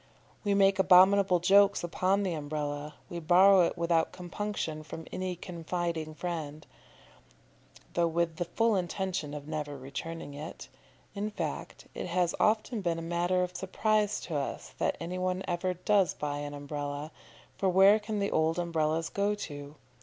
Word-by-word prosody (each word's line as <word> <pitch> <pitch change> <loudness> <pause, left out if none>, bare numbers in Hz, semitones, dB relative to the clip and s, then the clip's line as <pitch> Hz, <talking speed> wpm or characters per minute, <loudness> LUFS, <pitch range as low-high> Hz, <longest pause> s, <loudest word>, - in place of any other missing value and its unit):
We 205 -2 +1
make 195 0 +4
abominable 190 0 +6
jokes 200 +3 +5
upon 185 +3 +1
the 185 -3 -1
Umbrella; 145 -1 -4
we 170 - -5
borrow 185 +3 +6
it - - -6
without 170 -1 +1
compunction 180 -3 -4
from 160 +1 -8
any 185 -1 -3
confiding 170 -2 -4
friend, 155 -3 -5 1.3
though 170 -1 +2
with 165 0 -1
the 175 - -1
full 225 +5 +1
intention 180 -4 -2
of 145 0 -8
never 150 -2 -4
returning 145 +3 -6
it 150 +3 -8 0.4
in 205 +1 -2
fact, 210 - -5
it - - -5
has 175 -1 +1
often 220 +1 +1
been 170 -3 0
a - - -4
matter 175 +2 +1
of 180 0 -5
surprise 210 +2 0
to 165 - -5
us 140 -1 -4
that - - 0
any 180 +2 -4
one 185 +1 -1
ever 180 +1 -1
does 195 +1 +2
buy 145 -1 -3
an 145 0 -5
Umbrella, 145 +1 -5 0.4
for 195 - +1
where 195 +3 +6
can 215 0 -4
the 200 0 0
old 160 +1 +2
Umbrellas 165 -2 0
go 205 +1 0
to? 145 -7 -8
175 Hz, 160 wpm, -30 LUFS, 155-190 Hz, 1.3 s, abominable